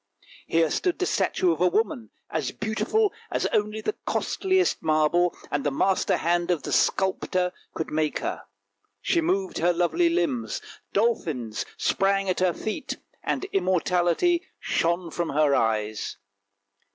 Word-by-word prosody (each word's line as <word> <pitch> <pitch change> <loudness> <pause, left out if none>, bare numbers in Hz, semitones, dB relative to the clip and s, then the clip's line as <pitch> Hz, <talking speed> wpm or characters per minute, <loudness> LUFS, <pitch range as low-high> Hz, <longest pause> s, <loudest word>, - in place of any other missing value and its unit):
Here 165 -2 +2
stood 360 -2 0
the 370 - 0
statue 185 - +1
of 165 0 -2
a 180 - +5
woman, 225 - 0 0.2
as - - -1
beautiful 220 - 0 0.2
as - - -1
only 210 +1 0
the 425 - -1
costliest 375 -1 +1
marble 160 +3 +2
and 145 -1 0
the 145 - +2
master 190 +7 +1
hand 175 +1 +1
of 170 -5 +1
the - - -4
sculptor 185 -1 +1 0.2
could 160 - -3
make 155 0 0
her; - - -4 0.5
she 340 - +1
moved 370 +2 0
her 175 +2 +3
lovely 180 - +2
limbs, 330 -9 -1 0.3
dolphins 160 - 0
sprang 195 0 +1
at 185 - 0
her 185 -1 +3
feet, 220 - -4 0.3
and - - -1
immortality 185 - +2 0.2
shone 170 0 0
from 170 0 -2
her 145 0 +3
eyes. 110 -3 0
185 Hz, 140 wpm, -26 LUFS, 165-245 Hz, 0.5 s, a